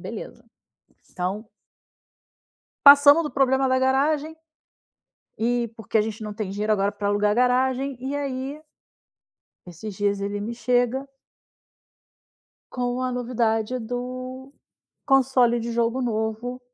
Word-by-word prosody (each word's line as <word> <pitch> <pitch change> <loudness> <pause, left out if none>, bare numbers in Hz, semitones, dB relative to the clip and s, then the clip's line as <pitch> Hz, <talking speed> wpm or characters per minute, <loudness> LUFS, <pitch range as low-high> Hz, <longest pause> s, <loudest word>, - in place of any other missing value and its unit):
Beleza, - - -8 0.7
então 195 +5 -4 1.4
Passamos 285 +3 +8
do 300 - -4
problema 265 0 +2
da 260 0 +2
garagem, 285 +4 +1 1.0
e 235 0 0
porque 225 0 -1
a - - +4
gente 220 +1 -5
não 210 -1 -5
tem 205 -2 -4
dinheiro 210 +2 0
agora 200 -1 0
pra 205 -1 -4
alugar 205 +1 +2
a - - +2
garagem, 255 +3 +1
e 270 +3 -4
aí 275 +1 -4 1.1
esses 190 +4 -8
dias 200 -1 0
ele 205 +1 -3
me 220 +3 -4
chega 245 +3 0 1.6
com 245 0 -2
a 255 0 -1
novidade 240 -1 -1
do 255 +3 -6 0.5
console 255 -3 +3
de 235 +1 -4
jogo 235 +2 0
novo 225 +2 -3
245 Hz, 120 wpm, -24 LUFS, 220-265 Hz, 1.6 s, Passamos